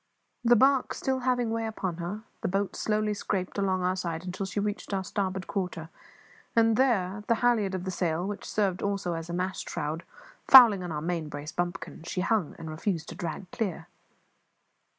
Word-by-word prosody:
The 240 0 +6
barque 265 +2 +4
still 265 -1 -1
having 245 -2 +1
way 225 0 -1
upon 190 -6 -3
her, 180 +5 -5 0.2
the - - 0
boat 195 +2 -1
slowly 215 0 0
scraped 200 -1 -2
along 190 -2 +1
our 185 +1 +1
side 170 -2 -3
until 190 +2 -4
she 205 - -2
reached 205 0 -2
our 190 - -1
starboard 190 -1 -2
quarter; 180 -5 -3 0.7
and 225 -1 +5
there 205 -6 +1
the 230 - +4
halliard 215 -6 +3
of 185 - -4
the 190 - -3
sail, 175 -1 -1
which 205 +1 -4
served 195 -4 0
also 200 -3 -1
as 165 0 -5
a - - -3
mast 185 +2 -2
shroud, 160 0 -3 0.5
fouling 235 -7 +10
our 160 -4 -4
main 165 -2 -2
brace 145 +1 -6
bumpkin 175 -2 -4
she 180 +2 -3
hung, 200 -4 0
and 160 -1 -7
refused 165 +1 -2
to - - -7
drag 175 +2 -5
clear. 200 -7 -3
190 Hz, 185 wpm, -28 LUFS, 175-215 Hz, 0.7 s, fouling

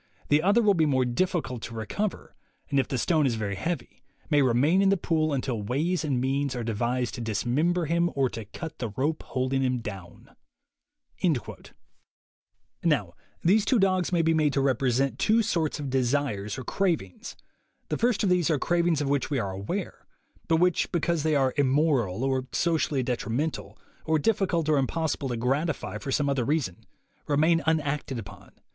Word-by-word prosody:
The 145 +1 +4
other 205 +7 +3
will 205 -1 +5
be 160 -4 +2
more 130 -3 +2
difficult 130 - -1
to 115 - -7
recover, 185 - -4 0.4
and 140 - +3
if 135 - +1
the 130 - -2
stone 155 +3 +2
is 120 - 0
very 105 -3 -3
heavy, 160 - -4 0.3
may 145 -1 +5
remain 140 +9 +3
in 195 - +4
the 195 - +3
pool 155 -3 0
until 130 -5 -2
ways 155 - -1
and 140 -5 0
means 135 +1 -1
are 120 - -3
devised 120 +3 -1
to 120 - -5
dismember 140 - 0
him 170 +2 +1
or 135 -1 +2
to 110 -1 -6
cut 160 - -8
the 120 -3 -2
rope 140 +9 -1
holding 130 +1 -1
him 130 -1 +1
down." 95 -6 -9 2.5
Now 130 - +1 0.3
these 200 +5 +4
two 255 - +2
dogs 185 -3 +2
may 170 -2 +2
be 165 0 +3
made 155 -3 +2
to - - +1
represent 135 0 +1
two 225 +1 +3
sorts 160 -7 -1
of 140 -3 -4
desires 125 -6 0
or 130 - -5
cravings. 160 - -2 0.5
The - - -1
first 235 -2 +2
of 200 - +2
these 175 -2 +2
are 155 - +2
cravings 170 0 +1
of 145 - -1
which 140 0 0
we 145 - 0
are 100 -5 -2
aware, 135 - -5 0.4
but 165 - +3
which, 180 +1 +2
be 170 - +1
cause 170 0 0
they 155 0 +1
are 135 -2 +2
"immoral," 135 - +2
or 130 -1 0
socially 155 -5 +1
detrimental, 125 +5 -3 0.3
or 160 0 +2
difficult 180 -2 +1
or 150 -2 +3
impossible 145 0 -1
to 120 - -2
gratify 140 +7 -1
for 135 - -5
some 145 +1 +1
other 135 -3 +1
reason, 135 - -2 0.4
remain 160 +3 +3
unacted 150 -4 0
upon. 100 -3 -10
145 Hz, 180 wpm, -27 LUFS, 125-165 Hz, 2.5 s, will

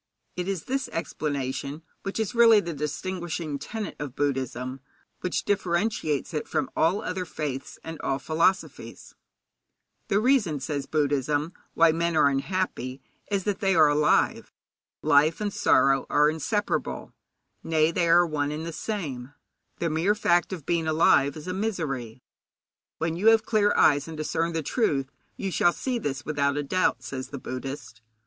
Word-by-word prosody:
It 180 0 -3
is 195 -5 -2
this 270 +1 -2
explanation 140 -2 -3 0.2
which 195 +2 -4
is 220 +1 -1
really 230 -2 +7
the 170 -4 -4
distinguishing 160 0 -4
tenet 220 +4 -5
of 140 -3 -6
Buddhism, 130 -2 -2 0.4
which 180 - -2
differentiates 175 -6 0
it 150 - -3
from - - -1
all 180 +6 +2
other 185 0 -3
faiths 150 -6 -5
and 160 -1 -7
all 135 - 0
philosophies. 165 +7 -1 0.9
The 200 - +2
reason, 215 - +2
says 140 +1 -3
Buddhism, 145 +1 0 0.2
why 165 0 +6
men 165 0 0
are 145 - +5
unhappy 140 -3 -2 0.3
is 200 -2 0
that 205 -1 -1
they 195 -2 +2
are 155 -2 +6
alive. 150 +1 +2 0.5
Life 150 +3 +4
and 205 -1 -2
sorrow 135 0 +3
are 150 +1 +4
inseparable 205 +7 -2 0.5
nay, 160 0 +2
they 170 0 +1
are 175 +1 +6
one 150 -3 -1
and 155 +2 -4
the 170 - -5
same 155 - -4
thing. 140 - -19 0.4
The 170 - -1
mere 170 +7 +2
fact 175 -4 +2
of 170 -7 -6
being 165 -2 0
alive 155 -3 +3
is 155 +3 -9
a 180 - -2
misery. 140 - -3 0.7
When 165 0 -1
you 195 +6 0
have 225 -1 +6
clear 210 -2 +3
eyes 145 0 +4
and 160 -1 -7
discern 165 +2 -1
the 160 -1 -2
truth, 140 - 0 0.3
you 195 -2 -3
shall 175 0 +3
see 255 -2 -2
this 135 - -4
without 145 -1 0
a 145 - -1
doubt, 185 +6 0
says 130 -1 -5
the 140 - -7
Buddhist. 130 -3 -7
160 Hz, 160 wpm, -26 LUFS, 145-185 Hz, 0.9 s, really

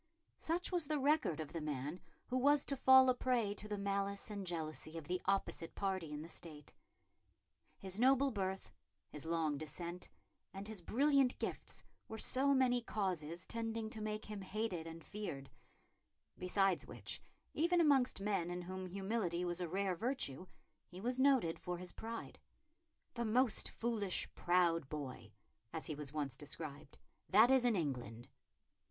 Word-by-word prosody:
Such 340 +4 -1
was 345 -5 +2
the 305 - +1
record 285 - +2
of 155 +1 -5
the 165 - -3
man 150 +3 -3 0.3
who 250 - -3
was 285 +2 +5
to 280 - -1
fall 260 0 +8
a 255 - +6
prey 245 -5 +1
to 210 +1 -6
the 210 -1 -2
malice 200 +1 -1
and 200 -2 -4
jealousy 160 -1 -4
of 155 -3 -7
the 180 0 -1
opposite 195 -3 0
party 190 -5 -1
in 150 0 -4
the - - -8
State. 155 -3 -8 1.0
His 190 +1 -6
noble 270 +2 +5
birth, 190 -3 -3 0.4
his 150 +1 -8
long 160 -3 0
descent, 170 +3 -6 0.5
and 195 +1 -4
his 215 -4 -6
brilliant 275 - +3
gifts, - - -4 0.2
were 220 - -6
so 270 +5 +2
many 250 -2 +3
causes 180 -6 -2
tending 225 -1 -3
to 220 - -5
make 215 0 -3
him 210 -2 -6
hated 190 -4 -3
and 165 0 -8
feared; 140 -11 -6 0.8
besides 185 0 +1
which, - - -6 0.3
even 345 +3 +3
amongst 280 -9 +4
men 195 -4 0
in 175 0 -4
whom 185 +1 -5
humility 190 -2 -1
was 175 +1 -2
a 175 - -2
rare 195 +1 0
virtue, 190 - -1 0.4
he 180 - -10
was 245 +5 -1
noted 260 -12 +4
for 180 0 -3
his 180 0 -7
pride 230 +1 -6 0.7
"the 235 - -2
most 235 +1 +2
foolish, 220 -5 0
proud 170 -5 +2
boy," 130 -7 -6 0.4
as 160 - -5
he 155 - -2
was 145 -2 -6
once 145 -3 -2
described, 145 -1 -7 0.3
"that 220 +6 +7
is 260 -2 +5
in 240 -3 +4
England." 125 - -3
195 Hz, 160 wpm, -37 LUFS, 165-235 Hz, 1.0 s, fall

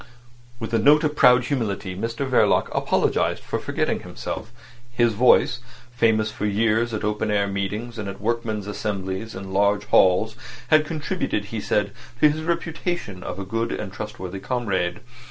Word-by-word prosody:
With 115 0 -5
a 115 - +3
note 150 +7 +5
of 150 -1 0
proud 125 -3 +6
humility 105 -8 -2
Mr 115 +7 -3
Verloc 130 - +3
apologised - - +1
for - - -3
forgetting - - -1
himself. 110 +2 -6 0.4
His 120 -2 +2
voice,—famous 120 -1 +2
for 105 - -3
years 110 +3 +1
at 110 - -3
open 105 +1 -1
air 105 -1 +2
meetings 105 +4 -3
and 100 -2 -4
at 100 - -8
workmen's 110 -1 -2
assemblies 100 0 -4
in 95 0 -7
large 100 +1 +2
halls, 105 +3 +4 0.3
had 155 -1 +5
contributed, 155 - -2
he 110 - -2
said, 105 -1 0 0.3
to 150 - +7
his 150 +1 -1
reputation 165 - -3
of 90 - -5
a 100 - -5
good 115 +4 -2
and 95 -2 -5
trustworthy 95 -3 -6
comrade. 100 -6 -1
110 Hz, 155 wpm, -23 LUFS, 100-120 Hz, 0.4 s, to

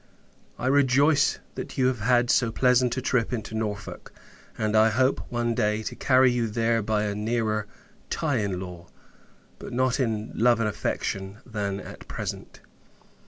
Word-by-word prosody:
I - - -5
rejoice 140 +2 +3 0.2
that - - -7
you 130 - +3
have 130 -2 +1
had 120 +2 +3
so 115 -3 +2
pleasant 125 +1 +2
a 130 - -2
trip 125 -3 +1
into 110 -3 -4
Norfolk; 105 -2 -5 0.5
and 110 0 0
I 110 +1 +6
hope, 130 +4 +1
one 120 -1 -1
day, 105 -2 0
to - - -5
carry 130 -1 +4
you 120 -1 0
there 115 +1 +1
by 105 0 0
a 105 -1 -1
nearer 110 0 -1 0.4
tie 145 -5 0
in 100 -4 -1
law, 90 -2 -8 0.7
but - - -8
not 130 +1 +1
in 110 -4 -1
love 120 0 +3
and 115 - +1
affection, 95 -1 -3
than 100 -4 -3
at - - -11
present. - - -6
115 Hz, 165 wpm, -26 LUFS, 105-125 Hz, 0.7 s, I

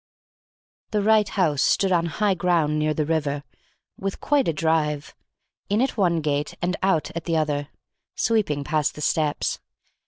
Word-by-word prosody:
The 210 -2 0
right 215 -1 +4
house 155 -7 +1
stood 195 +3 +2
on 170 -1 +2
high 205 +4 +1
ground 165 -4 +1
near 155 0 +1
the 155 - 0
river, 145 -2 -1 0.6
with 195 0 -3
quite 290 -2 +2
a - - +3
drive 155 -2 0 0.6
(in 205 +2 +2
at 265 +2 +1
one 175 -6 +2
gate 145 -1 -1
and 180 +1 -1
out 175 -6 +1
at 170 - -4
the 165 -2 +1
other) 145 -2 -1 0.5
sweeping 205 -11 +1
past 150 0 0
the 150 - -8
steps. 150 0 0
160 Hz, 160 wpm, -24 LUFS, 150-195 Hz, 0.6 s, right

